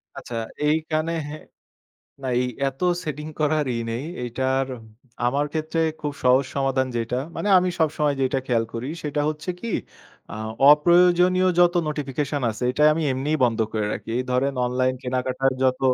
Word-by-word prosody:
আচ্ছা 120 - -7 0.3
এইখানে 155 +1 0 1.1
না - - -4
এই - - +1 0.2
এত 135 0 -11 0.2
সেটিং 150 0 -5
করার 150 0 +2
ই - - -2
নেই। 120 +4 -3 0.2
এইটার 130 +2 0 0.6
আমার 140 +4 +1
ক্ষেত্রে 160 +1 -2 0.2
খুব 145 -1 -3
সহজ 130 +2 +5
সমাধান 135 -1 +1
যেইটা, 115 +1 -1 0.2
মানে 205 - -2
আমি 180 0 +1
সবসময় 150 -2 +1
যেইটা 135 0 +1
খেয়াল 115 -2 +1
করি 115 +3 -4
সেইটা 150 -1 -2
হচ্ছে 150 +2 -3
কি 235 - -5 0.6
আ - - -6 0.4
অপ্রয়োজনীয় 180 +4 +5
যত 175 0 +5
নোটিফিকেশন 145 -1 -2
আছে, 110 +3 -8
এইটা 150 - -1
আমি 165 - -1
এমনিই 145 +4 -1
বন্ধ 115 -2 +1
করে 105 -2 -1
রাখি। - - -6
এই 130 - -1
ধরেন 135 +2 +1
অনলাইন 130 +1 +1
কেনাকাটার 130 +1 0
যত 130 0 +2
140 Hz, 155 wpm, -23 LUFS, 130-155 Hz, 1.1 s, সহজ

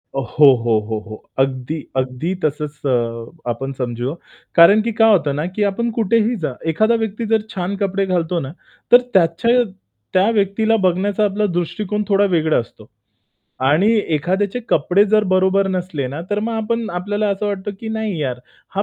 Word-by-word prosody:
हो, 135 +3 +2 0.2
हो, 115 -2 +2
हो, 110 +1 -4
हो, 110 - -7 0.2
अगदी. 135 +2 -1 0.2
अगदी 130 +7 -2
तसंच 150 0 -2
अ, 120 +3 -2
आपण 135 +3 -3
समजू. 125 +1 -3 0.4
कारण 185 +6 +7
की 230 +2 -2
काय 225 0 +6
होतं 150 -8 +2
ना 150 - -2
की 210 - +1
आपण 235 +4 -2
कुठेही 230 +2 +2
जा, 130 - -3
एखादा 215 +9 +2
व्यक्ती 220 +2 -4
जर 220 - +3
छान 190 -1 -3
कपडे 195 -1 0
घालतो 175 -2 0
ना, 135 -3 -6 0.4
तर 245 - +9
त्याच्या 190 +8 +3 0.5
त्या 185 +3 +4
व्यक्तीला 215 +3 +1
बघण्याचा 195 +3 +1
आपला 205 +1 0
दृष्टिकोन 210 +4 -2
थोडा 200 -1 +3
वेगळा 160 -1 +2
असतो. 115 - -10 0.8
आणि 185 +9 +3 0.2
एखाद्याचे 190 +9 -1
कपडे 180 +7 +3
जर 215 +1 +3
बरोबर 190 +1 +3
नसले 180 -7 -3
ना, 145 +5 -6
तर 205 - 0
मग 230 - -2
आपण 225 +1 -2
आपल्याला 205 +3 -1
असं 200 +1 -2
वाटतं 200 0 -3
की, 225 - -6
"नाही 215 -5 -3
यार, 125 -3 -2 0.4
हा 200 - +2
185 Hz, 170 wpm, -19 LUFS, 145-210 Hz, 0.8 s, तर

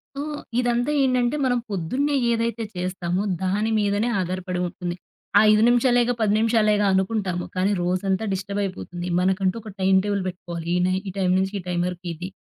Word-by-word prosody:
So, 280 - -3 0.4
ఇదంతా 245 +2 +1
ఏంటంటే 255 0 +2
మనం 250 -1 +2
పొద్దున్నే 255 - -1 0.2
ఏదైతే 230 0 -1
చేస్తామో 180 0 -2 0.2
దాని 205 +4 0
మీదనే 205 +2 +1
ఆధారపడి 185 0 -3
ఉంటుంది. 175 0 -5 0.4
ఆ - - +8
5 215 0 +4
నిమిషాలేగా, 245 0 +3
10 210 -2 +3
నిమిషాలేగా 215 -2 +3
అనుకుంటాము. 190 -2 0
కాని 185 +2 +1
రోజంతా 185 +3 0
డిస్టబయిపోతుంది. 190 -2 -4
మనకంటూ 185 +1 +1
ఒక 220 - -9
టైమ్ 190 0 +4
టేబుల్ 200 -2 -1
పెట్టుకోవాలి 170 -2 -6
ఈ - - +2
నై 185 - +1
ఈ - - -4
టైం 185 -1 +2
నుంచి, 190 +1 0
ఈ - - -7
టైం 175 -1 -1
వరకు 180 0 -7
ఇది. 175 +3 -7
195 Hz, 165 wpm, -23 LUFS, 185-225 Hz, 0.4 s, ఆ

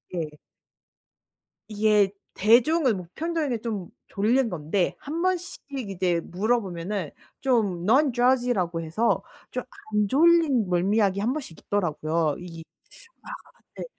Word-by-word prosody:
예. 155 -3 -4 1.3
이게 210 -2 +3 0.2
대중은 245 - +4
보편적인 310 - -3
게 240 - -1
좀 210 -6 -4 0.2
졸린 235 +5 +2
건데 175 +2 -1
한 315 +4 -4
번씩 365 -1 -1 0.3
이제 180 -3 0
물어보면은 190 -3 -2 0.3
좀 215 -10 +1
non-drowsy라고 245 - +2
해서 175 +9 0 0.3
좀 - - -3 0.3
안 210 -1 +2
졸린 295 - +4
멀미약이 195 +2 +2
한 230 +5 +1
번씩 270 - -6
있더라고요. 160 -5 0
이 170 -2 -9 0.6
아 - - -14 0.5
네. - - -5
210 Hz, 255 characters per minute, -25 LUFS, 175-255 Hz, 1.3 s, 대중은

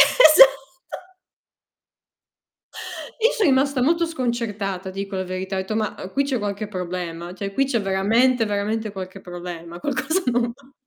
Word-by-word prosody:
Esatto. 310 - +8 2.8
I 460 - +5
so' 435 - +2
rimasta 275 -3 +3
molto 335 +5 +2
sconcertata 215 - -3
dico 195 0 -5
la 185 - -2
verità, 185 +1 -4
ho - - 0
etto: 190 +3 -4
"Ma, 215 -2 -1
uhm, 190 - -7
qui 280 +1 +1
c'è 265 -3 -1
qualche 205 0 -3
problema, 175 -3 -5
cioè 200 +1 -5
qui 275 - +2
c'è 240 -5 0
veramente, 225 +6 +2
veramente 215 +1 -2
qualche 190 0 -7
problema, 175 -1 -8
qualcosa 290 - -1
non 240 -1 +1
va." 275 +1 -23
210 Hz, 150 wpm, -22 LUFS, 190-260 Hz, 2.8 s, Esatto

